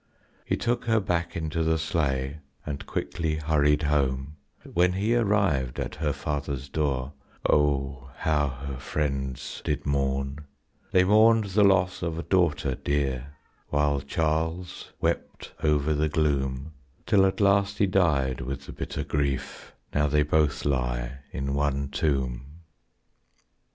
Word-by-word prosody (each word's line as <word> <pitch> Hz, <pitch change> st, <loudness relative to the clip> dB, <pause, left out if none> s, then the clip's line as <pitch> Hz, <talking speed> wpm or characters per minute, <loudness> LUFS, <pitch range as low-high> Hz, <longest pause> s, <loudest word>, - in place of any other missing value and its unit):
He -, -, 0 dB
took 120 Hz, +1 st, -1 dB
her 115 Hz, -1 st, +3 dB
back 85 Hz, -3 st, -1 dB
into 80 Hz, 0 st, -2 dB
the 80 Hz, 0 st, +2 dB
sleigh 70 Hz, -3 st, -1 dB, 0.3 s
and 75 Hz, -2 st, -5 dB
quickly 80 Hz, -3 st, -2 dB
hurried 75 Hz, -1 st, +2 dB
home; 70 Hz, -1 st, 0 dB, 0.4 s
When 90 Hz, +1 st, +3 dB
he 105 Hz, +5 st, +1 dB
arrived 100 Hz, -, +1 dB
at -, -, -3 dB
her 75 Hz, -1 st, -1 dB
father's 70 Hz, -1 st, -3 dB
door, 70 Hz, -2 st, -1 dB, 0.3 s
oh, 70 Hz, -2 st, +1 dB
how 75 Hz, -2 st, +1 dB
her 70 Hz, 0 st, -6 dB
friends 70 Hz, -2 st, -3 dB
did 75 Hz, -, -2 dB
mourn; 70 Hz, 0 st, 0 dB, 0.5 s
They 90 Hz, -, +5 dB
mourned 110 Hz, +3 st, +5 dB
the 105 Hz, +2 st, +4 dB
loss 95 Hz, -2 st, +3 dB
of 85 Hz, -2 st, -2 dB
a 85 Hz, -, -3 dB
daughter 85 Hz, -7 st, +2 dB
dear, 70 Hz, 0 st, -2 dB, 0.4 s
while 75 Hz, -1 st, +1 dB
Charles 80 Hz, +4 st, -2 dB
wept -, -, -2 dB
over 75 Hz, 0 st, +2 dB
the 75 Hz, +1 st, +1 dB
gloom, 70 Hz, -1 st, 0 dB, 0.3 s
Till 100 Hz, -2 st, +4 dB
at 95 Hz, -1 st, +1 dB
last 100 Hz, 0 st, +3 dB
he 100 Hz, -, +4 dB
died 75 Hz, -9 st, +2 dB
with 70 Hz, +2 st, -5 dB
the -, -, -8 dB
bitter -, -, -4 dB
grief, 70 Hz, -2 st, -3 dB, 0.2 s
now 75 Hz, 0 st, +2 dB
they 75 Hz, +1 st, +3 dB
both 75 Hz, -1 st, +1 dB
lie 60 Hz, -1 st, -1 dB
in 70 Hz, 0 st, -3 dB
one 70 Hz, -1 st, 0 dB
tomb. 65 Hz, -4 st, -1 dB
75 Hz, 135 wpm, -27 LUFS, 70-85 Hz, 0.5 s, They